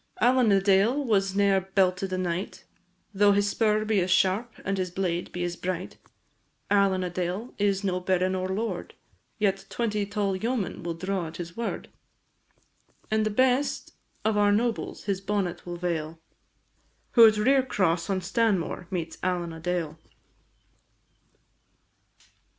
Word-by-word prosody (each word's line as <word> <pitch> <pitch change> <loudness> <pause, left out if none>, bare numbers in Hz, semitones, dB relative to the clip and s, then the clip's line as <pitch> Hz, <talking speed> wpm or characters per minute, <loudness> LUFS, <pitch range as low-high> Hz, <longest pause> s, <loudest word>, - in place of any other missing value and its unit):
Allen 245 -1 +4
a 195 - +5
Dale 200 +8 +3
was 195 -4 +1
ne'er 200 -1 +3
belted 190 0 0
a 185 - -1
knight, 180 0 -3 0.5
Though 205 +1 +5
his 205 0 +2
spur 215 0 +1
be 215 -2 +2
as 180 0 0
sharp, 195 +5 +2
and 195 0 -1
his 185 -1 -1
blade 175 -1 -2
be 175 - -3
as 175 0 -2
bright; 185 0 -4 0.7
Allen 195 -2 +3
a 180 - -2
Dale 180 +6 -3
is 200 -1 +1
no 185 -2 0
baron 185 0 +1
or 185 0 -2
lord, 220 +4 -3 0.4
Yet 195 -3 0
twenty 210 -4 -1
tall 200 -1 -1
yeomen 225 0 -2
will 170 -1 -4
draw 185 0 -2
at 160 - -9
his 170 -1 -7
word; 235 -1 -4 1.2
And 215 0 +2
the - - +1
best 255 +5 +1 0.3
of 220 -1 +2
our 205 0 +4
nobles 225 +2 -1
his 195 -2 -2
bonnet 195 -3 -2
will 175 0 -5
vail, 165 -2 -3 0.9
Who 230 -2 +9
at 215 -1 +3
Rere 265 +6 +4
cross 185 -8 0
on 190 -1 0
Stanmore 190 -2 0
meets 165 -3 -4
Allen 175 -2 -1
a 160 - -9
Dale. 165 -2 -3
195 Hz, 150 wpm, -27 LUFS, 180-210 Hz, 1.2 s, Who